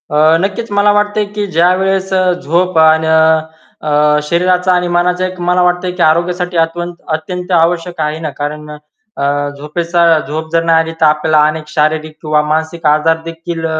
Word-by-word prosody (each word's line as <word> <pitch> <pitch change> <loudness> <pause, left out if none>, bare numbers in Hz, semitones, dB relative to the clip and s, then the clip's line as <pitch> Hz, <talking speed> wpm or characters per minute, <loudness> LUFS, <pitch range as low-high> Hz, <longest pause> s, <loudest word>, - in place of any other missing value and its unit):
अ, - - +2 0.3
नक्कीच 205 +3 -3
मला 205 0 +3
वाटतंय 205 0 0
की 205 - 0
ज्यावेळेस 190 +3 +1
अ, 190 - +2
झोप 175 +2 -1
अन 160 0 +4 0.8
अ, 150 0 +2
शरीराचा 180 +2 +1
आणि 180 0 0
मनाचा 180 +1 +1
एक 185 0 -6
मला 180 +1 +1
वाटतय, 180 +1 0
की 180 0 -6
आरोग्यासाठी 175 +2 0
अत्यंत 175 +1 -3
आवश्यक 170 +1 0
आहे 150 +1 -2
ना, 160 -1 -4
कारण 150 +1 -5
अ, 145 -1 -5
झोपेचा 170 +2 +1
झोप 160 +1 -5
जर 165 0 +2
नाही 165 -1 +3
आली 165 0 -5
तर - - +5
आपल्याला 155 0 +2
अनेक 155 0 -4
शारीरिक 155 0 -1
किंवा 150 -1 +1
मानसिक 160 +1 -2
आजार 155 +2 +2
देखील 165 0 -6
165 Hz, 160 wpm, -13 LUFS, 155-180 Hz, 0.8 s, तर